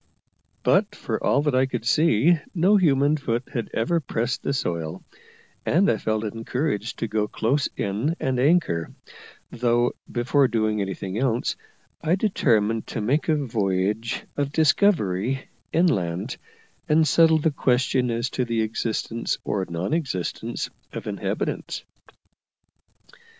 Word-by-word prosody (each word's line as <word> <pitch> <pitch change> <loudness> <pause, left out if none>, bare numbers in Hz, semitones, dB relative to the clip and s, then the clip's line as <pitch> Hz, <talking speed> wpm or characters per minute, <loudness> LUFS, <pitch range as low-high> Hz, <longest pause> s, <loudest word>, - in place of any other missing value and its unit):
But - - +3
for - - -4
all 140 - +3
that 145 -2 +1
I 130 +1 +3
could 120 -3 -4
see 155 +3 +4 0.2
no 185 +5 +4
human 150 -5 +3
foot 120 -3 -2
had 120 -3 -3
ever 165 +10 +1
pressed 120 -3 -2
the - - -2
soil, 85 - -3 0.6
and 185 +5 +3
I 110 - 0
felt 110 +1 -1
encouraged 115 +1 -2
to 115 - -2
go 105 -1 0
close 135 +8 0
in 110 +11 -1
and 130 -2 0
anchor; 135 - +2 0.6
though, 120 0 +2 0.2
before 130 +3 +2
doing 110 -3 0
anything 95 +1 -4
else, 125 -2 0 0.5
I 165 +3 +2
determined 115 - +1
to - - -4
make 135 +10 0
a 155 - +4
voyage 105 -4 -1
of 140 -1 -1
discovery 135 - +2 0.2
inland, 95 - 0 0.5
and 155 +1 +4
settle 160 0 +5
the 155 +1 +1
question 125 -2 +1
as 115 +2 -1
to 130 - 0
the 115 -2 0
existence 115 +1 -2
or 95 -2 -2
non 85 - -2
existence 130 - -3 0.2
of - - -6
inhabitants. - - -3
120 Hz, 135 wpm, -24 LUFS, 110-150 Hz, 0.6 s, settle